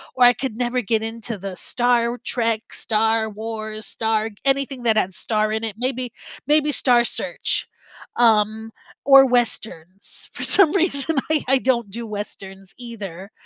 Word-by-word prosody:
or 250 - +3
I 245 - +7
could 245 -1 -5
never 245 +1 -1
get 220 +1 0
into 225 0 -4
the 195 -1 -6
Star 240 +3 +1
w 235 +1 -3
Trek, 230 -2 -2
Star 220 0 +1
Wars, 215 0 -6
Star 220 -1 -1 0.2
anything 270 -2 0
that 220 -2 +3
had 190 -3 +1
star 215 +1 0
in 220 +1 -2
it, 215 -3 -2
maybe 250 -1 -2 0.4
maybe 300 0 +3
Star 245 -4 +3
Search, - - -2 0.5
um, 220 -1 +2 0.3
or 270 -1 +8
Westerns. 215 -7 -3
For - - -6
some 385 -6 +4
reason, 325 -4 0
I 310 -2 +1
I 270 - +4
don't 240 -5 0
do 235 +2 -6
Westerns 195 -2 -8
either, 205 -6 -8
230 Hz, 155 wpm, -21 LUFS, 215-250 Hz, 0.5 s, or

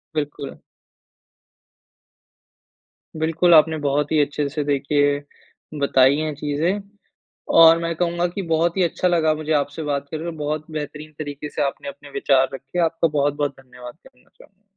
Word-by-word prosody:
बिल्कुल। 145 -2 -4 2.6
बिल्कुल 165 +2 +2
आपने 160 0 +5
बहुत 145 +2 0
ही 155 - +3
अच्छे 145 0 -1
से 150 +1 -3
देखिए 145 0 +1 0.6
बताई 135 0 +4
हैं 155 -1 -2
चीज़े। 150 +7 -1 0.8
और 165 0 +9
मैं 170 0 -2
कहूँगा 175 +1 0
कि 180 +3 -5
बहुत 170 +3 +1
ही 185 - +3
अच्छा 175 +2 0
लगा 160 -3 +2
मुझे 155 0 -5
आपसे 145 +1 -1
बात 140 -1 -2
करके, 160 +2 -4
बहुत 150 +1 -3
बेहतरीन 150 0 -6
तरीके 145 -1 -6
से 150 - -4
आपने 140 - -7
अपने 140 +1 -12
विचार 135 -2 +2
रखे। 135 +6 -6
आपका 165 +1 +1
बहुत, 145 -2 0
बहुत 145 -1 -1
धन्यवाद 125 -1 -12
करना 125 - -26
चाहूँगा। 200 +1 -21
150 Hz, 150 wpm, -22 LUFS, 145-160 Hz, 2.6 s, और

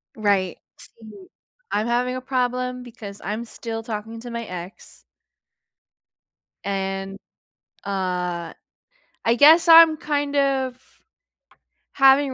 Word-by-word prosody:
Right. 200 -5 0 0.2
See, 230 - -14 0.4
I'm 215 +3 0
having 250 +1 0
a 255 - -5
problem 250 -1 -2
because 210 -4 -10
I'm 215 +4 -3
still 225 -1 -6
talking 225 0 -6
to 240 - -8
my 235 -1 -5
ex 180 +2 -9 1.6
and, 195 0 -3 0.7
uh, 180 -3 -3 0.7
I 230 +1 +3
guess 325 +5 +7
I'm 325 -1 +8
kind 290 -1 -2
of 265 -2 0 1.2
having 270 0 +4
235 Hz, 100 wpm, -22 LUFS, 200-265 Hz, 1.6 s, I'm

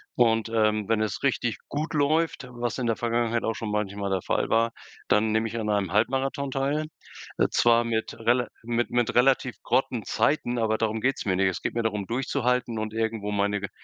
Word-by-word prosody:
Und, 115 -2 +3
ähm, 110 -2 +1
wenn 110 -1 +2
es 105 -4 -2
richtig 125 -4 0
gut 150 +3 -3
läuft, 155 -1 +1
was 120 +1 -3
in 125 - -1
der 115 - +2
Vergangenheit 115 0 0
auch 115 - 0
schon 110 0 -5
manchmal 100 -1 -2
der 95 -2 -1
Fall - - 0
war, 115 +1 +2 0.4
dann 110 +1 +3
nehme 110 +1 +1
ich 115 +1 -4
an 105 -1 -2
einem 100 -4 0
Halbmarathon 135 +5 0
teil. 140 +3 -1 0.5
Äh, - - +3
zwar 120 0 +4
mit 115 -1 -2
rela 120 +1 +2 0.2
mit 120 +1 -1
mit 120 -1 +1
relativ 125 0 +3
grotten 125 -4 0
Zeiten, 125 -5 +1
aber 110 -1 +1
darum 110 0 0
geht's 135 +4 0
mir 95 -3 +1
nicht. 95 0 +3
Es 90 - -4
geht - - -3
mir 115 - 0
darum, 105 -3 -2
durchzuhalten 125 -2 0
und 110 0 -4
irgendwo 110 -2 -1
meine 100 0 0
ge 100 - -4
115 Hz, 205 wpm, -26 LUFS, 110-125 Hz, 0.5 s, zwar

